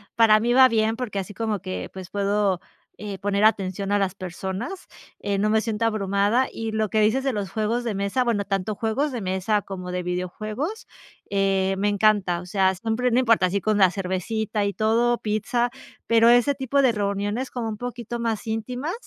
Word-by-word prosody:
para 220 -2 +6
mí 240 +2 +1
va 260 +1 +8
bien, 225 -1 +1
porque, 235 -6 -3
así 195 +1 -6
como 220 0 -2
que, 90 -1 -5
pues 185 -2 -8
puedo, 200 -2 +1 0.4
eh, 205 -2 -6
poner 200 0 0
atención 195 -2 +1
a - - +4
las 195 -2 0
personas, 190 - -5 0.3
eh, 200 -1 -1
no 210 +2 +2
me 220 0 +3
siento 225 0 -1
abrumada, 205 +3 +1
y 225 -1 -4
lo 220 -1 0
que 220 - +1
dices 220 +6 +2
de 270 - +1
los 205 -3 -3
juegos 220 +5 -1
de 225 -3 -2
mesa. 200 +6 0
Bueno, 225 -4 +1
tanto 195 +1 -2
juegos 235 +8 -1
de 240 - -3
mesa 190 +3 0
como 185 -2 -7
de 180 0 -2
videojuegos, 215 - -4 0.4
eh, 195 -1 +1
me 205 +2 0
encanta. 205 -4 +2
O - - -10
sea, 190 +1 +2
siempre 225 +5 -1
no 240 - +4
importa 230 -6 +4
así 195 +2 -1
con 215 +2 +1
la 190 -3 +5
cervecita 200 +3 -2
y 200 - -1
todo 230 +3 +2
pizza, 225 +3 0 0.4
pero 230 0 +4
ese 245 +4 +5
tipo 275 0 +1
de 260 - +4
reuniones 205 +3 -2
como 235 -3 -4
un 215 - -5
poquito 240 0 -5
más 225 -2 -2
íntimas, 245 +8 -3
215 Hz, 200 wpm, -24 LUFS, 195-230 Hz, 0.4 s, va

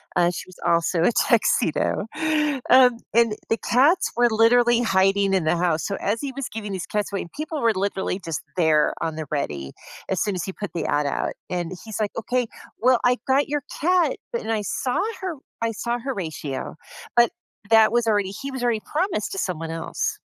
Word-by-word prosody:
uh, 175 -1 +4
she 175 - -5
was 185 - -15
also 170 0 +2
a 175 - +4
tuxedo. 210 -5 +2 0.6
Um, 250 -2 +6 0.2
and 230 -2 +4 0.2
the 225 - +2
cats 290 +9 +3
were 240 0 +4
literally 235 +2 +4
hiding 195 -2 +2
in 190 -3 +2
the 155 +2 +1
house, 170 -2 0
so, 200 - -2
as 210 +3 -1
he 280 - -3
was 275 -2 -3
giving 210 -2 -5
these 185 -3 -4
cats 210 -1 -2
away 200 - -2
and 170 - -9
people 310 0 -4
were 230 -1 +3
literally 190 -1 -2
just 165 -2 -3 0.2
there 160 -3 +3
on 160 -1 -2
the 155 0 -4
ready 70 - -3 0.4
as 190 - 0
soon 205 -3 0
as 175 - -2
he 190 - -5
put 205 +1 -5
the 170 - -2
ad 145 0 +1
out, - - -1 0.2
and 175 -1 -3
he's 220 -1 -6
like, 210 -2 0
"Okay, 245 +2 0 0.3
well, 250 +1 +4
I 245 0 +4
got 275 +2 +2
your 295 -1 -1 0.2
cat," 355 +2 +3 0.2
but 475 - -1
and 225 - -3
I 220 -1 0
saw 250 +5 -1 0.2
Hor 370 -4 -3 0.3
I 230 - +1
saw 235 +3 -2
Horatio, 165 - -4 0.4
but 240 -1 +5 0.4
that 220 -1 +7
was 240 0 +2
already 205 -3 +2
he 270 +7 -6
was 260 -2 -5
already 230 -3 +1
promised 320 - 0
to - - -5
someone 165 -4 -3
else. 420 - -3
215 Hz, 205 wpm, -23 LUFS, 180-245 Hz, 0.6 s, that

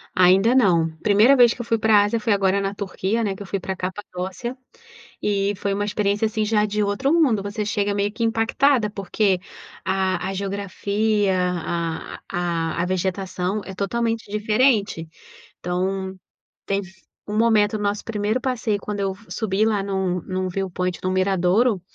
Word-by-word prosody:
Ainda 190 +5 +5
não. 170 -10 +3
Primeira 215 +6 +5
vez 240 -3 +5
que - - -6
eu - - -7
fui 230 -1 +1
para 215 -2 +5
Ásia 210 +3 0
foi 220 0 +1
agora 195 0 +2
na 195 +1 -2
Turquia, 200 +2 -2
né, 200 -3 -1
que 190 - -12
eu 200 - -7
fui 195 - -2
para 190 +1 -4
Capadócia. 185 +5 -5 0.7
E 200 -1 +1
foi 200 +1 -1
uma 205 +1 -1
experiência, 205 0 0
assim, 215 0 -1
já 210 -1 +2
de 210 0 -1
outro 205 +7 0
mundo, 265 -12 +3
você 205 +1 -3
chega 205 0 0
meio 205 0 -1
que 230 - -3
impactada 225 +2 +2
porque 200 -1 0 0.4
a 190 -1 0
a - - -3
geografia, 200 +1 0 1.0
a 170 -2 -1
a - - 0
vegetação 185 +1 -2
é 190 - -7
totalmente 225 +2 -2
diferente. 210 -5 +1 0.5
Então, 190 +2 -2 0.5
teve 195 -1 -2 0.3
um 210 +1 -3
momento 215 -2 +3
no 210 - -4
nosso 205 +1 -1
primeiro 215 +2 -1
passeio 230 -5 -1
quando 205 0 -4
eu 195 -1 0
f 210 +3 -20
subi 215 -1 0
lá 215 -2 +1
num 190 -2 -1
num 185 0 -2
viewpoint 180 -1 -2
do 185 - -2
miradouro 190 +3 +2
200 Hz, 165 wpm, -22 LUFS, 190-215 Hz, 1.0 s, Ainda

